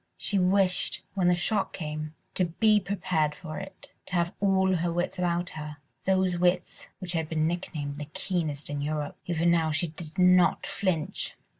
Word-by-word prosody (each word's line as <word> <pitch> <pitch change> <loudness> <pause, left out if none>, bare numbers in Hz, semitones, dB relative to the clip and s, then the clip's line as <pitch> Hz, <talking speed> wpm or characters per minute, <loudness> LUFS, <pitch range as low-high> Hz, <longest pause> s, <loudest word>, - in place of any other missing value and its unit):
She 200 - 0
wished, 185 0 +2
when 185 -2 +2
the 180 - +5
shock 195 +3 0
came, 155 -1 -5 0.2
to 185 - +2
be 210 +5 +3
prepared 180 -5 0
for 155 -3 -6
it, 195 0 -11
to 180 - -3
have 170 0 +1
all 190 -2 +3
her 170 +1 0
wits 175 +2 -2
about 175 0 0
her—those 160 +5 -2
wits 180 0 0
which 185 -3 -4
had 160 -2 -1
been 155 -1 +1
nicknamed 155 -4 -3
the 150 - -4
keenest 155 -2 -3
in 145 -1 -2
Europe. 150 0 -2
Even 170 0 +2
now 165 -2 +3
she 155 +2 0
did 155 0 -10
not 180 -1 +5
flinch. 175 -6 -1
175 Hz, 170 wpm, -28 LUFS, 155-185 Hz, 0.2 s, the